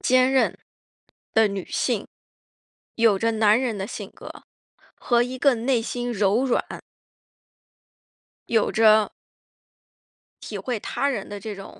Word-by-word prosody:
坚 255 0 +3
韧 265 - +2 0.8
的 220 -1 +5
女 200 -2 -5
性， - - -1 0.9
有 225 -4 +3
着 230 +3 0
男 215 0 +3
人 245 -5 -2
的 195 +1 -4
性 - - -7
格， - - -11 0.7
和 240 -1 +1
一 255 +1 -5
个 275 -1 +4
内 240 0 0
心 245 +1 -3
柔 210 +4 +2
软 255 - +1 1.9
有 220 - +2
着 215 -1 +4 1.3
体 210 - -6
会 235 +4 -3
他 275 - -2
人 275 - -3
的 205 0 -6
这 210 0 -6
种， 195 - -12
225 Hz, 140 characters per minute, -24 LUFS, 210-250 Hz, 1.9 s, 的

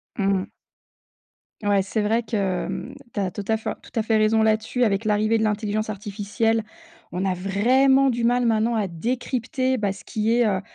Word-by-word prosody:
Mmh 195 -1 +1
mh. - - -7 1.2
Ouais, 200 -1 +3
c'est 205 +3 -2
vrai 225 +3 +2
que, 225 0 -5
hem, 195 +6 -2 0.2
tu - - -1
as 190 -2 -1
tout 205 - -5
à 220 0 +2
fait 220 - -4
tout 230 - -5
à - - +1
fait 220 0 +1
raison 220 +1 +3
là-dessus. 220 +3 +1
Avec 205 0 +1
l'arrivée 215 +1 +2
de - - +1
l'intelligence 215 0 -1
artificielle, 215 +2 -1 0.5
on 180 +2 -2
a 185 - +1
vraiment 255 +9 +3
du 235 0 -2
mal 245 0 +2
maintenant 225 +1 +2
à 210 -3 0
décrypter, 255 +6 -1
bah, 205 -3 0
ce 195 - -10
qui 220 +1 0
est, 240 -1 +3
heu, 190 -2 0
215 Hz, 195 wpm, -23 LUFS, 200-235 Hz, 1.2 s, Ouais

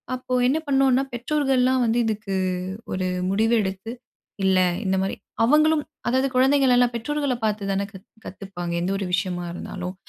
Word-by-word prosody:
அப்போ 255 0 -6
என்ன 270 +5 +2
பண்ணுன்னா, 270 -1 +3
பெற்றோர்கள்லாம் 260 0 +1
வந்து 230 +1 +1
இதுக்கு 210 -3 -2 0.6
ஒரு 185 0 -1 0.2
முடிவு 225 +4 +2
எடுத்து, 190 +3 -5 0.5
இல்ல 190 -1 +4 0.3
இந்தமாரி 190 0 0 0.3
அவுங்களும் 305 +4 +4 0.2
அதாவது 260 +2 +2
குழந்தைங்களெல்லாம் 255 -2 +4
பெற்றோர்கள 285 +2 -1
பார்த்து 210 -2 -1
தான 195 +1 0
கத் 190 +1 -12 0.2
கத்துப்பாங்க. 180 -3 -6
எந்த 180 +2 -1
ஒரு 195 - -3
விஷயமா 175 -1 -1
இருந்தாலும். 180 +1 -6
225 Hz, 135 wpm, -23 LUFS, 190-260 Hz, 0.6 s, இல்ல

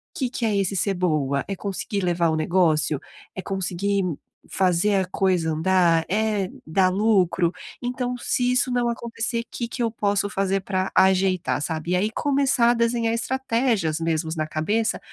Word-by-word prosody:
Que 260 -3 -1
que 240 -1 -3
é 215 - +1
esse 195 0 0
ser 195 +1 +1
boa? 150 -6 0
É 195 - -2
conseguir 200 +1 -4
levar 175 -1 +1
o 160 - 0
negócio? 155 -3 +2 0.4
É 190 - -4
conseguir 195 +1 -1 0.5
fazer 190 +2 +2
a 190 - +2
coisa 180 -3 0
andar? 165 0 +2
É 210 -2 0 0.2
dar 185 +4 +3
lucro? 185 -4 +2 0.3
Então 250 0 -2
se 245 +1 0
isso 250 0 +1
não 245 -1 +1
acontecer, 235 0 -3
que 235 - -4
que 240 +1 -3
eu 230 - 0
posso 205 -2 0
fazer 195 -1 0
para 185 0 -2
ajeitar, 190 -4 +2
sabe. 160 +2 -3
E 180 - +3
aí, 210 +4 +1
começar 270 -3 +2
a - - +3
desenhar 230 -1 +1
estratégias 230 -8 0
mesmo 165 -1 -1
na 155 0 -1
cabeça 210 +9 -1
195 Hz, 165 wpm, -23 LUFS, 175-230 Hz, 0.5 s, dar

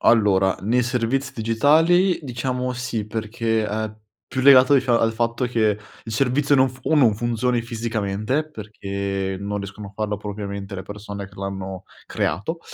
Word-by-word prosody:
Allora, 95 -4 +4
nei 120 +5 +2
servizi 125 +2 -1
digitali 160 - +3
diciamo 125 -1 -2
sì, 120 -4 -3
perché, 110 0 -1
ehm, 110 0 -3 0.3
più 130 0 -2
legato 135 0 +7
dic 130 -1 +2
al 115 -2 +3
fatto 115 +2 0
che 110 -4 +1 0.3
il 110 - -6
servizio 135 +4 +2
non 130 -1 +5
fu 125 +1 -13
o - - +5
non 125 -8 +5
funzioni 120 +2 0
fisicamente, 115 +4 -2
perché 100 -4 -4
non 105 +1 -3
riescono 100 +1 -7
a 100 - -15
farlo 105 0 -2
propriamente 100 -1 -6
le 95 - -5
persone 100 -1 -7
che 100 - -20
l'hanno 95 -1 -5 0.2
creato; 105 - -2
110 Hz, 155 wpm, -22 LUFS, 100-125 Hz, 0.3 s, legato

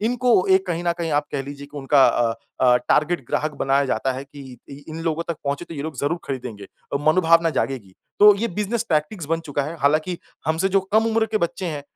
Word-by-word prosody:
इनको 240 -2 +2
एक 190 +1 +2
कहीं 175 -1 -2
न 170 - +2
कहीं 165 -1 -2
आप 145 0 +1
कह 140 - -1
लीजिए 140 +1 -9
की 145 - -13
उनका 135 0 +4
अ 115 -1 +1 0.3
अ, 125 -1 +5
टारगेट 155 -3 +1
ग्राहक 155 +5 -1
बनाया 135 +1 +2
जाता 130 +1 0
है 130 +2 -6
कि 140 -3 -12
इ 140 +1 -10
इन 160 +1 -6
लोगों 165 0 -1
तक 170 - -2
पहुँचे 140 +4 -2
तो 165 - -10
ये 140 - -4
लोग 155 -2 -6
ज़रूर 145 +6 -1
खरीदेंगे। 125 -6 -6
अ, 140 - -7
मनोभावना 165 +1 +4
जागेगी। 130 -9 -3 0.3
तो 210 0 +9
ये 230 +3 -1
बिज़नेस 210 +4 -2
टैक्टिस 155 +2 -1
बन 165 +2 0
चुका 145 -3 -3
है। 155 +4 -5
हालाँकि 155 +5 +1 0.3
हमसे 160 +4 +1
जो 195 +1 +3
कम 220 +1 +4
उम्र 225 0 +2
के 215 0 -1
बच्चे 175 +1 -2
हैं 150 -4 -4
155 Hz, 230 wpm, -22 LUFS, 140-175 Hz, 0.3 s, तो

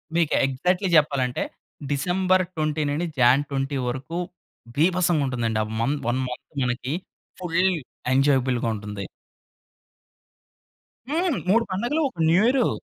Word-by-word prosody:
మీకు 170 -3 +2
ఎగ్జాక్ట్‌లీ 180 +8 0
చెప్పాలంటే, 135 -4 +1 0.5
డిసెంబర్ 185 +6 +2
20 155 0 0
నుండి 155 +5 -1
జాన్ 125 +4 +5
20 135 0 -2
వరకు 130 +7 -4 0.6
బీభసంగా 175 -2 +3
ఉంటుందండి. 115 -3 -1
ఆ - - -4 0.2
మం 140 +5 +1
1 125 +2 +1
మంత్ 125 - -8
మనకి, 125 +3 -2 0.5
ఫుల్ 175 +1 +1 0.5
ఎంజాయబుల్‌గా 130 -3 +2
ఉంటుంది. 105 -1 -6 2.0
హ్మ్. 330 0 +1
3 230 +3 +4
పండగలు, 240 +12 0
ఒక 175 - -17
న్యూయరు. 240 +8 +4
150 Hz, 110 wpm, -24 LUFS, 130-180 Hz, 2.0 s, జాన్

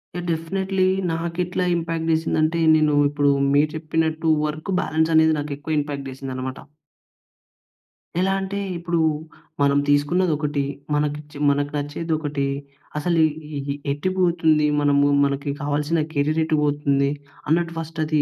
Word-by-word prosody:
Yeah! 175 0 -4
Definitely 185 +4 0 0.3
నాకెట్లా 170 +2 -2
impact 165 -1 -2
జెసిందంటే, 160 0 +1 0.2
నేను 155 -1 +3 0.2
ఇప్పుడు 145 -1 +2 0.2
మీరు 150 +1 +4
చెప్పినట్టు 160 0 -1 0.2
వర్క్ 155 +5 -4
బాలన్స్ 160 -3 +1
అనేది 160 0 +5
నాకెక్కువ 145 +1 -3
ఇంపాక్ట్ 145 -2 -4
జెసిందన్నమాట. 130 0 -5 1.6
ఎలా 190 +1 +2
అంటే, 195 +1 -4 0.2
ఇప్పుడు 170 0 -2 0.6
మనం 140 0 +4
తీసుకున్నది 160 +5 +2
ఒకటి. 150 -1 -1 0.3
మనకి 150 0 0
చే - - -10
మనకు 145 0 0
నచ్చేది 145 +3 -4
ఒకటి. 145 -2 -2 0.5
అసలు 170 +2 +1
ఎ 155 -1 -4
ఏ 140 0 -3 0.2
ఎటు 145 +6 -1
పోతుంది, 165 -4 +3 0.2
మనము 145 0 +3 0.2
మనకి 140 +1 -2
కావాల్సిన 150 +3 0
కేరిర్ 155 +2 +1
ఎటు 155 -1 +1
పోతుంది. 140 -1 +1 0.4
అన్నట్టు 170 +2 +1
ఫస్ట్ 165 0 -7
అది 155 -1 +2
155 Hz, 130 wpm, -22 LUFS, 145-165 Hz, 1.6 s, అనేది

